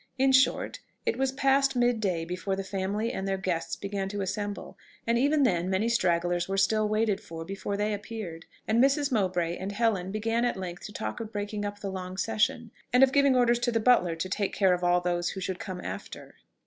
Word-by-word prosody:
In 265 0 +4
short... 260 0 +3 0.3
it - - +1
was 265 0 0
past 275 0 +2
mid 245 -1 +2
day 180 -6 -1
before 185 +3 -3
the 195 - -4
family 200 +4 -2
and 190 - -3
their 195 0 0
guests 180 -3 -2
began 200 -1 -3
to 205 0 -3
assemble; 205 +1 -4 0.3
and 230 - +2
even 290 +2 +3
then 180 -7 +1
many 190 +4 +1
stragglers 175 -5 +1
were 195 - -1
still 215 +2 +2
waited 215 -1 +1
for 165 -5 -8
before 195 +2 -4
they 210 +1 0
appeared, 200 -5 -6 0.2
and 230 +3 +4
Mrs. 280 +1 +2
Mowbray 180 -6 0
and 195 +2 -5
Helen 200 -4 0
began 225 +3 0
at 245 -5 0
length 180 -2 -6
to - - -11
talk 110 - -4
of 220 -1 -6
breaking 205 0 -3
up 205 0 -5
the 195 - -3
long 185 0 -6
session, 225 +3 0 0.2
and 250 +2 +6
of 265 - +5
giving 280 -1 +4
orders 240 -1 +3
to 240 - 0
the 225 - +1
butler 215 -8 +3
to 165 +3 -3
take 200 +1 -2
care 190 -3 +4
of 180 0 -2
all 175 0 +3
those 175 0 0
who 195 - -5
should 185 -1 -3
come 185 -1 -6
after. - - -7
205 Hz, 220 wpm, -28 LUFS, 185-230 Hz, 0.3 s, and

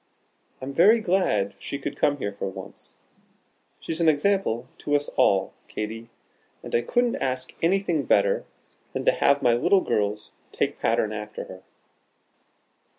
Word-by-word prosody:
I'm 135 +1 -5
very 205 +10 +6
glad 175 - +1
she 140 - -4
could 140 - -5
come 145 0 +1
here 100 -7 -3
for 100 - -4
once. - - -10 0.8
She's 165 +1 -4
an 165 - +5
example 150 - +1
to 145 - 0
us 145 0 0
all, 95 -1 +2
Katy, 115 +2 -5 0.5
and - - -9
I 120 - +3
couldn't 240 - +1
ask 130 -1 -2
anything 170 -4 +1
better 100 -2 +3 0.5
than - - -3
to - - +6
have 140 0 +2
my 120 - +5
little 180 +11 +3
girls 105 - -1 0.2
take - - -1
pattern 110 0 +1
after 105 0 -6
her." 95 - -11
135 Hz, 150 wpm, -25 LUFS, 105-170 Hz, 0.8 s, very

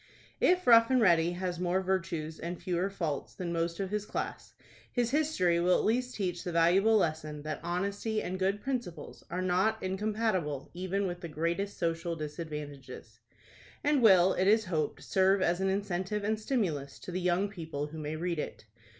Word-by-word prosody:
If 365 0 +3
"Rough 230 -1 +7
and 260 -1 +4
Ready" 170 -5 +4
has 180 -1 -3
more 180 +1 +1
virtues 175 -4 -2
and 170 +1 -5
fewer 180 +1 -1
faults 165 -7 -4
than 175 -2 -4
most 170 0 -1
of 195 -1 -3
his 210 -1 -1
class, - - -5 0.4
his 240 -1 0
history 270 - +2
will 180 +1 +4
at - - -1
least 250 +3 0
teach 180 -4 -2
the 180 - -3
valuable 185 +7 +4
lesson 155 -5 -1
that 155 -1 -4
honesty 200 +5 -2
and 185 -2 -4
good 195 +2 0
principles 235 - -5
are 185 +1 -2
not 185 +5 +2
incompatible 190 -7 -1
even 185 +3 -2
with 175 -1 -4
the 170 - -5
greatest 170 +6 -2
social 165 0 -1
disadvantages, 150 -6 -7 0.6
and 290 -2 +3
will, 190 -4 +6
it 185 - +1
is 220 +1 +4
hoped, 155 -5 -2
serve 190 +1 +3
as 175 0 +1
an 190 - +2
incentive 195 +1 -2
and 215 +1 0
stimulus 175 - -2
to - - -8
the 185 +1 -2
young 180 +3 +2
people 160 -7 -5
who 155 +2 -8
may 155 +1 -4
read 170 0 -2
it. 130 - -6
180 Hz, 180 wpm, -30 LUFS, 165-200 Hz, 0.6 s, Rough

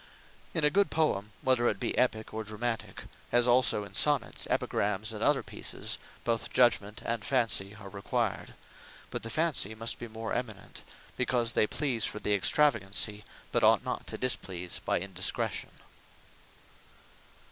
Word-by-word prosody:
In 165 - 0
a 150 - +4
good 200 +1 +3
Poem, 110 -11 0
whether 130 -2 +3
it - - 0
be 120 - -2
Epique, 110 -3 0
or 110 0 -3
Dramatique; 115 +2 -4 0.3
as 120 0 +4
also 120 -4 +4
in 100 - -11
Sonnets, - - +2
Epigrams, 105 +2 0
and 105 - -7
other - - +3
Pieces, - - -5 0.2
both 115 -1 -1
Judgement 105 -4 +2
and 115 -1 -1
Fancy 115 -6 0
are 100 - -10
required: 100 0 -2 0.6
But - - -2
the 115 - -5
Fancy 145 - 0
must 115 +1 0
be 120 - -6
more 110 0 -5
eminent; 120 -5 -5 0.4
because 120 -2 +1
they 110 - +3
please 130 -6 0
for - - -2
the 105 - 0
Extravagancy; 105 -3 +2 0.3
but - - +1
ought - - +5
not - - -4
to - - -4
displease 90 -8 -1
by - - +1
Indiscretion. 90 0 -2
115 Hz, 150 wpm, -30 LUFS, 105-125 Hz, 0.6 s, ought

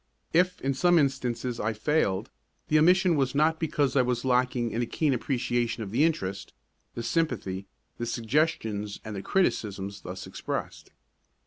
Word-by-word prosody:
If 180 +2 +3
in 135 +1 0
some 175 +6 +4
instances 125 -4 0
I 110 +2 0
failed, 110 -4 0 0.4
the 155 - +5
omission 180 +2 +5
was 135 -1 0
not 160 +2 +3
because 145 -4 0
I 135 - +6
was 125 0 -1
lacking 125 -2 +1
in 115 - -1
a 120 - -1
keen 150 +1 +1
appreciation 120 -2 -1
of 100 - -7
the 130 +7 +3
interest, 100 - -1 0.4
the 115 - -4
sympathy, 105 - -1 0.3
the 120 - -2
suggestions 115 -4 -1
and 110 -1 -5
the 95 - -4
criticisms 100 - -1
thus 90 +1 -7
expressed. - - -5
125 Hz, 155 wpm, -28 LUFS, 110-150 Hz, 0.4 s, I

